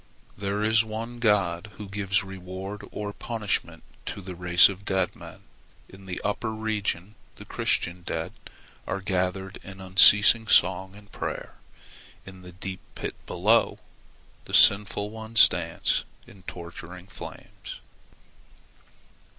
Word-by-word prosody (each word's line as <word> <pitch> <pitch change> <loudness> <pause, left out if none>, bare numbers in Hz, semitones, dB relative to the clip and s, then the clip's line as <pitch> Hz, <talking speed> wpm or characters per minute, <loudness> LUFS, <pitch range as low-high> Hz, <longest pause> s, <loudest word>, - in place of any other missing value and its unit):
"There 100 +1 -2
is 110 +1 +4
one 115 +2 -6
God 100 -5 +1
who 105 - -8
gives 100 -1 0
reward 95 +1 -7
or 105 -1 -5
punishment 110 -3 -3 0.2
to - - -4
the 95 -1 -7
race 90 0 +6
of 100 0 -7
dead 95 -2 -1
men. - - -12 0.5
In 95 0 -14
the 90 - -4
upper 110 +2 -2
region 105 -3 -2 0.2
the - - -12
Christian 85 +1 -1
dead - - -4 0.5
are 100 - -2
gathered 95 0 -2
in 95 -1 -11
unceasing 105 +4 +6
song 95 0 +3
and 105 0 -16
prayer. - - -5 0.7
In 95 -1 -12
the 90 -1 -11
deep 95 +1 -7 0.2
pit - - -4
below, - - +2 0.7
the - - -2
sinful 105 +1 +4
ones 110 0 +5
dance - - -1 0.2
in 95 - -16
torturing 85 +1 -9
flames. 95 - -10
100 Hz, 125 wpm, -26 LUFS, 95-105 Hz, 0.7 s, race